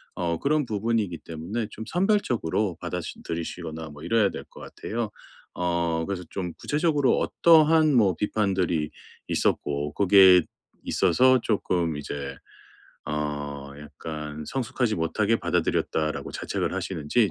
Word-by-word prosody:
어 85 -2 -1
그런 150 0 +1
부분이기 105 -5 -1
때문에 90 +8 -4
좀 110 0 -8
선별적으로 125 - 0
받아시 - - -5
들이시거나 80 -1 -5
뭐 75 +1 -12
이래야 105 +2 +3
될 - - -7
것 - - -15
같아요. 115 -1 -4 0.4
어 85 -2 0
그래서 95 -2 -3
좀 90 -3 -4
구체적으로 150 -4 +1
어떠한 160 -2 +5
뭐 100 -7 +4
비판들이 95 -7 0 0.4
있었고 75 +1 0
거기에 95 -2 +7 0.4
있어서 130 0 +4
조금 90 -8 0
이제 70 -1 -5 0.7
어 75 -2 -4
약간 75 0 -7
성숙하지 125 -3 -1
못하게 105 +7 +1
받아들였다라고 80 -3 -1
자책을 - - -2
하시는지 90 +8 0
90 Hz, 305 characters per minute, -26 LUFS, 80-115 Hz, 0.7 s, 거기에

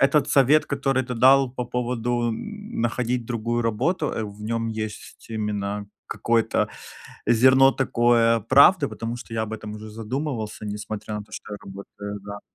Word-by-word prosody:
этот 140 +1 +3
совет, 140 +3 +4
который 135 -2 0
ты 125 0 -5
дал 135 +2 +5
по 125 0 -4
поводу 120 -1 -1
находить 125 - -3
другую 120 0 -2
работу, 115 - 0
э, 110 - -3
в 105 0 -8
нём 115 +1 -2
есть 110 -1 -6
именно 105 -2 -3 0.2
какое-то 115 -1 +1 0.6
зерно 130 +3 +6
такое 120 -3 +3
правды, 140 - +6
потому 115 +1 -5
что 120 -2 -10
я 110 -1 0
об 110 0 -5
этом 105 -1 -7
уже 110 0 -8
задумывался, 110 -1 -4
несмотря 105 +1 -5
на 105 - -5
то, 105 - -25
что 105 - -7
я - - -6
работаю, 100 +1 -8
да. 100 0 -8
115 Hz, 160 wpm, -24 LUFS, 105-130 Hz, 0.6 s, зерно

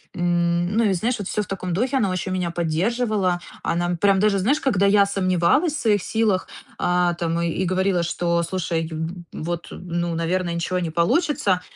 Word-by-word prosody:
M, 175 0 +1
ну, 230 - +4
и 200 -3 +3
знаешь, 235 +7 0
вот 200 - -4
всё 210 - -1
в 205 - -6
таком 185 -2 -4
духе, 250 +9 0
она 205 -7 +1
очень 185 +1 -3
меня 180 -2 -1
поддерживала. 185 +3 0 0.2
Она 175 +1 0
прям 195 -1 +4
даже, 205 0 +3
знаешь, 265 +11 +2
когда 205 -8 +2
я 200 0 +5
сомневалась 190 - +2
в 305 - -3
своих 205 -4 +2
силах, 215 -4 0 0.3
э, 180 0 +2
там 170 0 -1
и 170 +2 -1
говорила, 185 -1 +1
что, 170 0 0
слушай, 165 -2 -2
ю 160 0 -6
ю 160 0 -2 0.3
вот, 170 +1 -4
ну, 175 -1 -3
наверное, 170 +1 -1
ничего 170 +2 -2
не 170 -3 -3
получится, 185 - +1
180 Hz, 190 wpm, -22 LUFS, 170-200 Hz, 0.3 s, я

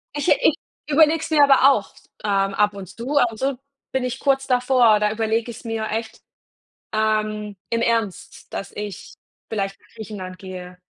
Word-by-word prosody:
Ich 290 +4 0
ich - - +4 0.3
überlege 310 +2 +5
es 320 - -5
mir 305 -2 +5
aber 275 0 +7
auch 210 -7 -1
s - - -21 0.2
ähm, 195 -1 +1
ab 210 +1 +2
und 195 -2 -8
zu 245 +8 -3
ab 245 -4 +4
und 220 - -10
zu 270 -1 -1 0.3
bin 265 -1 0
ich 250 +1 -3
kurz 270 -1 +1
davor, 250 -4 +4
da 210 0 +1
überlege 225 +1 -1
ich's 235 - -11
mir 225 -1 -2
echt, 225 +1 -4 0.7
ähm, 215 -1 0
im 230 0 0
Ernst, 230 -1 -2
dass 195 - -5
ich 205 -3 -7 0.3
vielleicht 195 -2 -3
nach - - -25
Griechenland 190 -4 -7
gehe. 180 -1 -9
220 Hz, 180 wpm, -22 LUFS, 205-260 Hz, 0.7 s, aber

